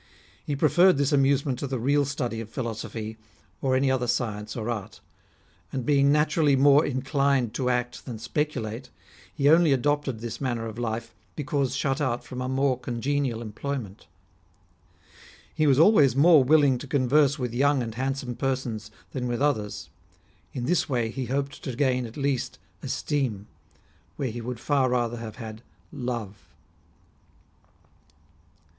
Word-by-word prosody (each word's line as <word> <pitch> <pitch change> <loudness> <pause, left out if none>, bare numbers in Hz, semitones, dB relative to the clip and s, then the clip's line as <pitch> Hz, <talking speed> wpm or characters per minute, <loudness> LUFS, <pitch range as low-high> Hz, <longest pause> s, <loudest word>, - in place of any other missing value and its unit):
He 145 - -2
pre 145 +3 +3
ferred 180 +1 +5
this 140 +1 +1
amusement 135 -2 +2
to 140 - -3
the 130 0 -2
real 140 +4 +2
study 125 -5 -3
of 110 - -9
philosophy, 110 -2 -5 0.4
or 130 -1 +1
any 135 0 +2
other 125 -2 0
science 110 -4 -2
or 110 -2 -4
art; 110 -5 -4 0.7
and 130 -3 -3
being 140 0 +4
naturally 150 -1 +3
more 140 +2 +6
inclined 135 -3 0
to 125 -1 -1
act 125 0 -2
than 120 -3 -5
speculate, 125 -2 -3 0.4
he 140 -2 0
only 160 +1 +6
adopted 140 -1 +1
this 120 +1 -6
manner 120 -4 -2
of 110 +1 -7
life, 115 -1 -3 0.2
because 140 -3 -1
shut 135 +1 -1
out 125 -4 -1
from 125 0 -7
a 130 - -2
more 130 -1 +1
con 120 -2 -5
genial 135 -3 -1
employment. 110 -2 -6 1.5
He 155 - +1
was 135 -2 +4
always 150 - +5
more 150 0 +6
willing 140 -2 +4
to 145 - -8
converse 140 +2 +3
with 125 -4 -3
young 140 +1 +2
and 115 -1 -5
handsome 130 +1 -3
persons 120 -5 -3 0.2
than 125 -2 -3
with 120 -1 -2
others; 130 -8 -1 0.6
in 125 -2 -4
this 175 +3 +1
way 120 -4 0
he 130 +1 -4
hoped 140 +2 -3
to 130 -4 -4
gain 125 -2 +1
at 115 - -12
least 140 -3 -1 0.2
esteem, 125 -9 -2 0.7
where 130 -4 -2
he 120 +1 -6
would 120 0 -5
far 135 -1 +1
rather 120 -1 0
have 115 -2 -7
had 110 -2 -8 0.3
love." 115 -5 -4
130 Hz, 155 wpm, -26 LUFS, 120-140 Hz, 1.5 s, more